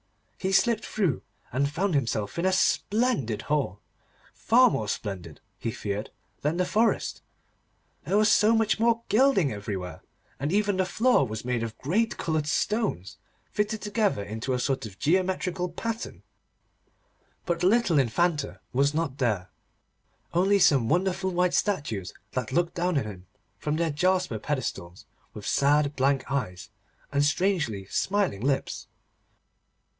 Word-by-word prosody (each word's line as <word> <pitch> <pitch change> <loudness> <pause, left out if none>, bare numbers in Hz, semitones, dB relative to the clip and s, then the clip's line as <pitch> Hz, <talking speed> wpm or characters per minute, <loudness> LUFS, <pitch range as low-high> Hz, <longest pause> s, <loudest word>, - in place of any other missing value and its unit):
He 190 0 -1
slipped 230 +4 +3
through, 185 - -1 0.3
and 140 +3 +1
found 185 +5 -1
himself 115 -3 -1
in 175 - 0
a - - +3
splendid 195 - +1
hall, 140 -10 -1 0.5
far 245 +1 +4
more 110 - -2
splendid, 90 -7 -5 0.2
he - - -2
feared, 105 -1 -4 0.3
than 150 +4 0
the 180 - +2
forest, 220 +4 +1 0.8
there 200 - +1
was 215 0 +4
so 215 +2 +5
much 220 -1 +2
more 230 0 +2
gilding 215 - +4
everywhere, 95 -5 -5 0.4
and 145 +3 -1
even 205 0 +1
the 190 - +2
floor 225 - +3
was 110 +1 -6
made 125 -2 0
of 115 -1 -5
great 210 - 0
coloured 155 -2 -1
stones, 205 - -1 0.3
fitted 210 +1 -1
together 205 - 0
into 110 +6 -3
a 125 - 0
sort 130 -3 -1
of 95 -3 -14
geometrical 180 - 0
pattern. 230 +6 -5 1.2
But 170 -1 -1
the 180 - +3
little 200 -7 +3
Infanta 150 +5 0
was 140 +3 +2
not 150 -4 -2
there, 105 -8 0 0.8
only 190 +4 +4
some 140 - +4
wonderful 190 +3 +1
white 180 0 +1
statues 135 - -1 0.2
that 130 -1 -3
looked 170 +4 +1
down 175 -2 0
on 135 - +1
him 95 -4 -9 0.3
from 150 0 -1
their 165 0 0
jasper 180 - +1
pedestals, 105 - -4 0.3
with - - -8
sad 145 +1 +2
blank 135 +1 +1
eyes 110 -7 -3 0.4
and 140 0 +2
strangely 145 - 0
smiling 190 - 0
lips. 135 +2 -1
150 Hz, 145 wpm, -27 LUFS, 115-195 Hz, 1.2 s, so